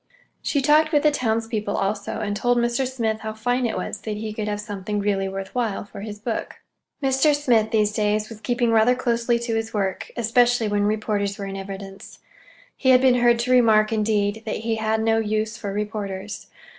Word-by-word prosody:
She 280 -2 0
talked 310 +2 +4
with 295 -2 +3
the 300 - +5
townspeople, 225 -5 -1
also, 200 +2 -2
and 205 -1 -2
told 245 +3 +1
Al 235 0 +3
Smith 235 -3 -1
how 220 0 -5
fine 245 +2 0
it 225 - -3
was 210 - -4
that 210 0 -4
he 215 0 -5
could 215 -1 -4
have 205 0 -2
something 205 -1 -4
really 195 -1 0
worth 195 0 -6
while 225 -6 -1
for 200 - -10
his 210 0 -6
book. 220 +2 -4 0.5
Mr. 270 +3 +3
Smith, 235 -7 +2
these 215 -2 +2
days, 210 0 0
was 220 -1 -11
keeping 240 +1 +1
rather 225 +2 +4
closely 235 -1 +1
to 235 -1 -3
his 225 0 -2
work, 195 -2 -2
especially 240 0 +3
when 205 0 +1
reporters 210 -2 -1
were 200 - -5
in 195 0 -5
evidence. 195 0 -8 0.6
He 260 - 0
had 255 -1 +7
been 255 -2 +4
heard 240 -1 +5
to 250 +1 -1
remark, 225 -3 +4
indeed, 210 -1 0
that 215 - -2
he 225 -1 0
had 220 0 0
no 225 0 +3
use 215 0 -1
for 205 -3 -5
reporters. 205 -1 -5
220 Hz, 200 wpm, -23 LUFS, 210-240 Hz, 0.6 s, had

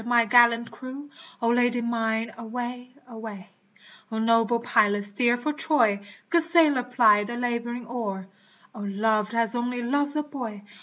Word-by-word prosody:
my 240 -1 +3
gallant 235 +1 +4
crew, 265 +3 -9 0.4
O 230 - +2
Lady 245 0 +2
mine 225 -1 -2
away! 245 +2 -6 0.2
away! 220 -5 -9 0.6
O 220 - -3
noble 230 +1 +2
pilot 205 -3 +2
steer 240 +4 +2
for 300 +5 -3
Troy, 295 -10 +2 0.3
Good 340 0 +4
sailor 325 -5 +3
ply 240 -4 +4
the 240 +3 -6
laboring 240 0 -3
oar, 215 -5 -5 0.5
O 225 - -11
loved 210 +2 -1
as 230 -1 +3
only 245 0 -2
loves 285 +4 +1
a 300 - 0
boy 240 -8 -7
235 Hz, 150 wpm, -25 LUFS, 220-250 Hz, 0.6 s, gallant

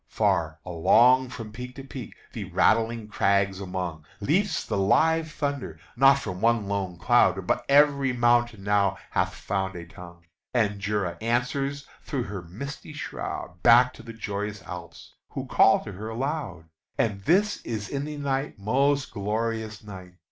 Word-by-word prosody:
far 80 -1 +1
along 120 +9 +4
From 115 -4 -8
peak 125 +3 -8
to 135 - -8
peak, 130 -3 -8 0.2
the - - -5
rattling 115 0 +2
crags 100 -2 +1
among, 90 -4 -4 0.2
Leaps 175 - +1
the - - -2
live 160 +10 +3
thunder! 140 - -3 0.2
not 135 0 +6
from 90 -8 -5
one 115 -3 +2
lone 95 -3 -2
cloud, 95 -3 +3
But - - 0
every 140 -1 +5
mountain 120 -3 +2
now 100 -2 +2
hath - - +1
found 95 -1 -3
a 85 -1 -7
tongue, 85 0 -13 0.3
And 105 -4 +1
Jura 100 -3 -2
answers 135 +4 -1 0.2
through 135 -4 -3
her 100 -4 -6
misty 140 - -8
shroud, 90 -10 -6
Back 125 +2 +6
to - - -12
the 115 0 -9
joyous 105 -2 -5
Alps, 85 -2 -9 0.2
who - - -4
call - - +4
to - - -7
her 105 +4 -7
aloud! 120 - -3 0.3
And 100 -3 0
this 205 +5 +2
is 110 -3 -4
in 140 0 -3
the 150 0 -6
night: 140 0 -2
most 135 +7 +1
glorious 110 +1 -3
night! 95 -3 -10
110 Hz, 155 wpm, -26 LUFS, 95-135 Hz, 0.3 s, not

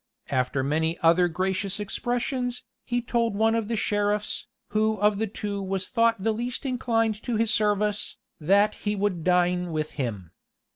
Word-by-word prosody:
After 130 +1 +1
many 160 +4 0
other 170 +2 +5
gracious 185 +3 -1
expressions, 245 +4 -2 0.2
he 245 -1 -1
told 235 -3 0
one 220 +2 +3
of 225 -2 0
the 230 - -1
sheriffs, 205 0 -1 0.2
who 215 +1 +2
of 205 0 +3
the 220 - 0
two 205 0 -4
was 190 -1 -2
thought 230 -4 +2
the 225 - +2
least 240 +5 -3
inclined 225 -4 0
to 240 - -2
his 225 0 +2
service, 210 0 +1 0.2
that 200 +6 +4
he 210 0 -2
would 195 -4 -1
dine 180 0 +2
with 155 -1 -2
him. 105 - -4
205 Hz, 160 wpm, -26 LUFS, 180-225 Hz, 0.2 s, other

